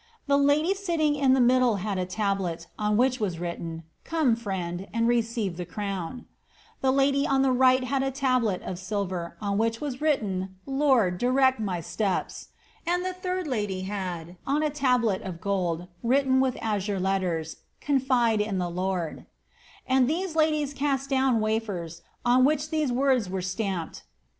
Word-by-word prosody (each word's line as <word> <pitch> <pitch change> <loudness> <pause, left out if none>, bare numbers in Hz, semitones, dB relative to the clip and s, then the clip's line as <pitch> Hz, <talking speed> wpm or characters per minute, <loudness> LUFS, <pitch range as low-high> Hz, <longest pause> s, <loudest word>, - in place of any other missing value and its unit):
The 280 -1 +3
lady 290 +6 +3
sitting 340 -6 0
in 275 -3 +3
middle 250 -2 +4
had 200 0 -2
a 180 - -2
tablet, 190 -4 -2
on 210 0 +1
which 255 +1 +2
was 190 -6 -1
written, 165 -1 -5 0.2
^ - - -41
Come, 310 -8 +2
friend, 190 -5 -4
and 230 0 +1
rece 230 -5 0
the 180 - -4
crown 195 +4 -5 0.3
;' - - -30
the 265 - +2
lady 275 +1 +2
on 270 -1 +3
the 265 - +3
right 255 0 +4
had 265 +1 0
a 270 - 0
tablet 255 -7 0
of 180 - -5
silver, 185 -3 -3
on 200 -1 -1
which 225 0 0
i 295 - -3
written, 195 -11 -1
' - - -36
Lord, 265 -10 +2
direct 260 0 +3
my 190 -5 -2
steps 195 +3 -2 0.2
;' - - -30
and 355 +1 +1
the 370 - -2
third 365 0 -3
lady 205 -9 -2
had, 185 -3 -5
on 290 +3 +1
a 305 - +1
tablet 250 -8 +1 0.2
gold, 180 -3 -1
written 260 +2 +3
with 260 -2 0
azure 205 -2 -1
letters, 180 -4 -1
^ - - -27 0.2
Confide 255 -6 +2
in 210 -2 -1
the 175 -1 -2
Lord 180 -2 -2
i* - - -16 0.6
and 260 -1 +3
these 350 +2 -1
laii 305 -2 +1
cast 275 -1 -1
down 260 -3 +3
wafers, 205 -7 -2 0.2
on 250 +1 +5
which 300 +2 +1
these 305 -4 +1
words 255 -5 +2
were 190 -1 -3
stamped. 185 -2 -3
230 Hz, 175 wpm, -26 LUFS, 190-270 Hz, 0.6 s, on